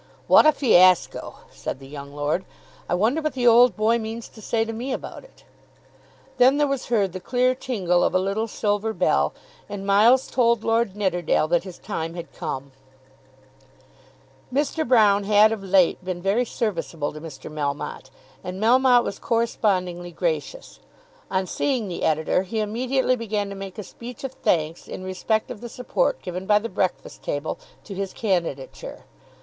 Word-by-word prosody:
"What - - +7
a - - +8
fiasco!" 185 - +3 0.2
said - - -5
the 135 0 -13
young 140 0 -9
lord, 150 +5 -1 0.5
"I 175 - +2
wonder 230 - +1
what 305 0 -2
the 255 -2 -2
old 240 -2 +6
boy 225 +2 +2
means 225 +1 -6
to 220 - -15
say 225 +1 0
to 225 - -5
me 245 +4 -4
about - - -6
it." - - -20 0.9
Then 255 +3 +5
there 295 - +3
was 275 -2 -2
heard 205 -6 +1
the 185 - -5
clear 250 +6 +1
tingle 190 -9 0
of - - +1
a - - +5
little 200 +4 -1
silver 210 0 -1
bell, 70 - +2 0.4
and 200 -1 -6
Miles 220 +6 +5
told 235 -3 +2
Lord 225 -3 +1
Nidderdale 175 -6 +1
that 175 +1 +1
his 185 -2 -9
time 165 +1 -5
had 170 -1 -8
come. 135 +1 -5 1.8
Mr. 290 +4 0
Broune 210 -5 +4
had 210 +1 +5
of 220 -2 -3
late 185 -2 +3
been 180 -1 -4
very 200 +7 +1
serviceable 170 -10 -3
to 155 - -9
Mr. 155 -3 -9
Melmotte, 145 -2 -4 0.3
and 185 +1 -6
Melmotte 245 +2 +5
was 200 - -5
correspondingly 185 -6 0
gracious. - - -3 0.5
On 190 0 0
seeing 250 +2 -1
the 175 - -5
Editor 160 +3 +1
he 195 +4 -4
immediately 255 +5 0
began 210 -4 -2
to 200 - -7
make 195 -1 -8
a 210 - -5
speech 240 +6 -10
of 270 - -3
thanks 160 -6 -1
in 185 - -7
respect 185 +4 -1
of 220 - -8
the 240 - -7
support - - -1
given 180 0 -5
by 210 - +5
the 225 +2 -3
"Breakfast 185 -1 -3
Table" 145 +2 -3 0.2
to 200 - -8
his 195 0 -4
candidature. 225 - -3
205 Hz, 170 wpm, -24 LUFS, 180-240 Hz, 1.8 s, a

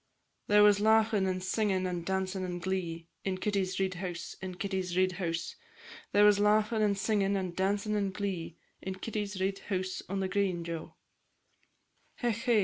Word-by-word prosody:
There 210 0 +6
was 205 -1 +6
laughin' 220 -2 +4
and 185 0 -2
singin', 190 -1 +1
and 175 -2 -2
dancin' 190 +1 -1
and 180 -1 -3
glee, 170 -2 -3 0.2
In 190 -1 -1
Kitty's 190 -1 -1
Reid's 190 -1 0
house, 175 -2 -5
in 185 -1 -5
Kitty 195 0 -2 0.2
Reid's 185 0 +3
house, 170 -2 -2 0.6
There 205 +1 +6
was 205 -1 +6
laughin' 215 +2 +3
and 205 -2 +2
singin', 200 -1 +1
and 185 -3 -2
dancin' 200 +3 0
and 200 -2 0
glee, 185 -4 -4 0.2
In 190 0 -4
Kitty 210 +1 -3
Reid's 195 +1 0
house 185 -2 -3
on 195 +1 -1
the 190 - 0
green, 185 -3 0
Jo! 165 -1 -6 1.2
Hech, 235 -3 -1
hey! 235 -4 +5
190 Hz, 170 wpm, -31 LUFS, 185-205 Hz, 1.2 s, There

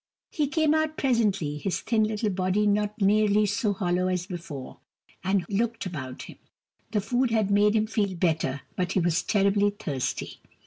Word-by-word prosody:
He 300 -2 0
came 310 +1 +2
out 315 0 0
presently, 200 - +1
his 190 +4 -2
thin 220 -2 +2
little 215 0 -1
body 185 +2 +1
not 210 +1 0
nearly 210 +1 +3
so 210 +1 0
hollow 185 -2 0
as 180 -1 -1
before, 170 -8 -8 0.4
and 190 -1 +1
looked 225 +2 -1
about 130 -8 -6
him. - - -12 0.5
The 210 -1 0
food 245 +4 +1
had 220 -3 +1
made 205 +1 +4
him 215 0 +3
feel 205 -3 -1
better, 155 -6 0
but 180 -1 -1
he - - +2
was 170 0 +1
terribly 200 0 +2
thirsty. 145 -10 -4
200 Hz, 170 wpm, -26 LUFS, 180-215 Hz, 0.5 s, made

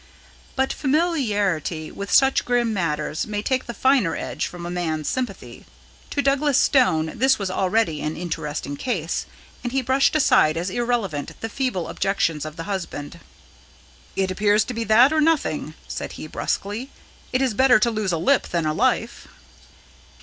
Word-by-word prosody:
But 265 0 +1
familiarity 210 - 0
with 200 0 -6
such 270 -1 +4
grim 240 -2 +1
matters 155 -5 -2
may 210 -1 -3
take 260 +1 -1
the 235 - -4
finer 260 -8 +2
edge - - -3
from 175 -1 -8
a 175 - -4
man's 160 -4 -2
sympathy. 255 -1 -4 0.4
To 285 - -1
Douglas 275 0 +2
Stone 160 - +2
this 265 +2 +4
was 195 -3 -3
already 190 -4 +1
an 155 +1 -3
interesting 155 -4 -4
case, 175 - -2 0.4
and 245 - -3
he 265 0 0
brushed 265 +4 +2
aside 160 - +4
as 175 +3 -2
irrelevant 225 - -2
the 225 - -3
feeble 235 -9 -2
objections 165 -6 -1
of 155 0 -7
the 165 - -6
husband. 170 -5 -5 1.0
"It 190 -1 0
appears 205 +3 +3
to 250 - -6
be 230 0 -2
that 240 +7 +6
or 310 - +3
nothing," 285 - 0
said - - -5
he - - -8
brusquely. 205 - -3 0.4
"It 255 +1 +1
is 255 -4 +1
better 260 +2 +5
to 235 +2 +2
lose 215 -4 -1
a 170 - 0
lip 270 +12 +2
than 170 -2 -1
a 155 - +1
life." - - 0
205 Hz, 165 wpm, -23 LUFS, 165-260 Hz, 1.0 s, that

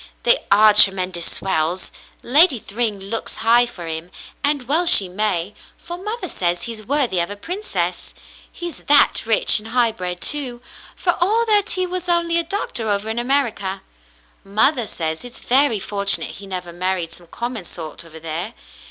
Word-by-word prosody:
"They - - +5
are 210 +1 +6
tremendous 185 -4 +3
swells. 175 -1 -2 0.3
Lady 290 +2 +5
Thryng 215 -1 -3
looks 200 +4 -4
high 240 +2 +5
for 180 -7 -10
him, 160 +1 -4 0.3
and 285 -3 +1
well 330 +6 +4
she 200 - +7
may, 190 -1 -1 0.2
for 345 - -7
mother 420 +2 -5
says 175 - -2
he's 230 -2 -6
worthy 255 -6 0
of 170 - -1
a 205 - -6
princess, 365 - -5 0.4
he's 345 -2 -7
that 290 0 +5
rich 225 -1 +4
and 215 - -9
high 235 0 +1
bred, 180 -4 -5
too, 260 -3 0 0.4
for 350 - 0
all 445 +5 +2
that 420 -1 +2
he 370 - 0
was 360 0 -5
only 340 -1 +2
a - - 0
doctor 325 - -3
over 205 +2 -1
in 230 - -3
America. 235 -7 -1 0.6
Mother 220 +5 +3
says 160 -3 -4
it's 245 0 -10
very 260 -3 +3
fortunate 200 0 0
he 200 - -11
never 180 -2 -6
married 180 -1 -2
some 175 0 -11
common 235 +2 -5
sort 160 -2 -6
over 160 -1 -13
there. 165 +8 -5
220 Hz, 170 wpm, -20 LUFS, 185-290 Hz, 0.6 s, she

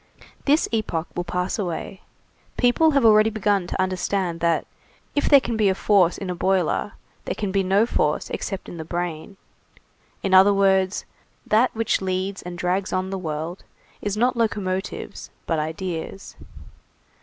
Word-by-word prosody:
This 295 +3 +3
epoch 190 -7 -2
will 175 - -2
pass 180 +4 -2
away, 185 0 -4 0.6
people 250 +6 +4
have 280 -5 +2
already 215 0 +6
begun 205 -4 0
to - - -4
understand 185 -1 -1
that, 170 0 +1 0.5
if 290 - +1
there 280 - +8
can 235 -3 -3
be 210 -3 +3
force 190 -3 +3
in 195 - -5
a 180 - -2
boiler, 190 +2 0 0.3
there - - -2
can 205 -3 -3
be 195 0 +2
no 195 +3 +3
force - - 0
except 195 -3 -4
in 175 - -8
the 160 - -5
brain; 175 +2 -4 0.9
in 195 - 0
other 195 +2 +7
words, 190 -1 +2 0.4
that 225 +4 +3
which 225 -2 0
leads 190 +1 -2
and 175 0 -7
drags 180 +2 -1
on 185 +1 -1
the 195 - -3
world, 160 +1 -5 0.4
is 205 0 -2
not 245 +3 +2
locomotives, 200 -4 -3 0.2
but 165 -2 0
ideas. 165 +4 -5
190 Hz, 155 wpm, -23 LUFS, 180-210 Hz, 0.9 s, there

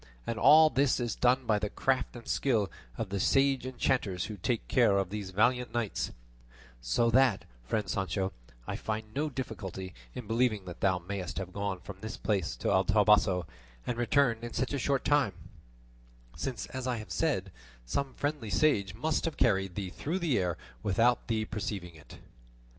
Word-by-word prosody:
And 115 -1 -3
all 155 +1 +8
this 135 0 +2
is 120 -2 -1
done 125 +1 +2
by 110 -2 +2
the 105 0 -2
craft 130 +3 0
and 120 - -10
skill 110 -8 +1 0.3
of 105 - -3
the 100 0 -2
sage 135 +4 +3
enchanters 120 -7 0
who 110 - -6
take 115 +5 -1
care 115 -6 +4
of 95 -1 -1
those 105 -2 -4
valiant 120 +6 +1
knights; 115 -4 -1 0.7
so 90 - +2
that, 130 -4 +4 0.2
friend 105 - -1
Sancho, 95 0 -1 0.3
I - - -3
find 110 0 -4
no 150 +3 -1
difficulty 95 -8 -6 0.2
in 125 - -6
believing 115 -2 +1
that 90 -2 -8
thou 95 -2 +3
mayest 90 0 -5
have 95 -1 -4
gone 100 -2 -3
from 100 - -9
this 110 +1 -5
place 95 - -1
to - - -1
El - - +3
Toboso 100 -4 +4 0.4
and 125 - -1
returned 120 -1 +2
in 120 - -6
such 130 - -1
a 140 - 0
short 135 +1 0
time, 145 -9 +3 1.0
since, 120 -7 -4
as 130 -1 -4
I 125 -2 0
have 110 - -8
said, 115 - 0 0.3
some 135 - -2
friendly 145 -6 -2
sage 100 -3 +2
must 155 +8 0
have 165 - -3
carried 95 -5 +2
thee 95 -3 -4
through 160 - -3
the 170 -8 +1
air 90 -3 -1 0.2
without 115 - +2
thee 110 -2 0
perceiving 100 -5 -4
it." 80 - -14
110 Hz, 180 wpm, -30 LUFS, 95-130 Hz, 1.0 s, all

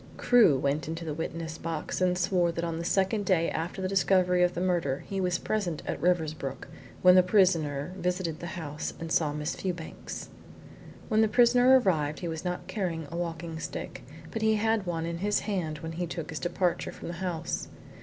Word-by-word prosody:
Crewe 230 - +5
went 140 +2 -1
into 165 +1 -4
the 155 - -3
witness 160 0 -5
box 165 +1 -3
and 180 -1 +3
swore 175 -1 +2
that 170 - -3
on 165 -1 -2
the - - -3
second 195 +4 +1
day 180 -4 +2
after 170 +4 -3
the - - +1
discovery 185 -1 +3
of 180 0 +3
the - - -2
murder 170 -7 0
he 195 -1 -2
was 180 -1 +1
present 185 -8 -2
at - - -3
Riversbrook 155 -6 -1 0.4
when 180 0 +9
the 185 - +8
prisoner 180 -6 +2
visited 180 -3 -2
the 175 - -6
house 150 -2 -5
and 165 -1 -6
saw 155 -3 +2
Miss 150 +2 -3
Fewbanks. 175 -4 -5 0.8
When 220 -1 +3
the 220 - +5
prisoner 245 +3 +6
arrived 155 -9 0
he 175 - -3
was 160 -1 -4
not 180 -1 -3
carrying 170 -7 -3
a - - -5
walking 165 -1 -4
stick, 165 - -6 0.3
but 225 - -3
he 220 0 +3
had 220 -2 +1
one 165 -2 -2
in 170 0 -4
his 205 +2 +1
hand 180 -7 -2
when 160 - -5
he 175 +2 -3
took 165 0 -5
his 155 - -4
departure 175 +3 -1
from - - -9
the 170 - -4
house. 170 -3 -3
175 Hz, 200 wpm, -28 LUFS, 160-185 Hz, 0.8 s, when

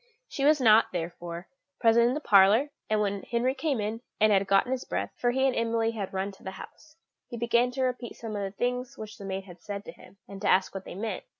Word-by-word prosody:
She 275 - -4
was 300 0 +5
not, 225 -3 +5
therefore, 170 0 -5 0.3
present 235 0 +5
in 245 - +1
the - - -1
parlour; 215 +5 +5 0.2
and 215 -1 +2
when 200 -1 -1
Henry 245 +2 0
came 275 -2 -1
in, 215 +2 -3 0.2
and 215 0 +5
had 195 -1 +3
gotten 195 +6 +3
his 260 -1 -1
breath - - -3
for 245 - 0
he 265 +2 +1
and 265 - +2
Emily 230 0 +1
had 205 -4 -5
run 195 +1 -2
to 195 - -19
the - - -5
house 310 0 -13 0.3
he 240 - -7
began 235 +1 +2
to 260 +1 -2
repeat 250 -2 -3
some 225 -2 -6
of 205 - -2
the 195 0 -5
things 250 +1 -2
which 215 0 -9
the 200 - -8
maid 190 0 -4
had 180 -2 -14
said 205 -1 -6
to - - -7
him, 200 - -18
and 195 -1 -10
to 205 - +1
ask 190 0 +3
what 195 -1 -6
they - - -8
meant. 210 0 -4
220 Hz, 255 wpm, -28 LUFS, 195-245 Hz, 0.3 s, was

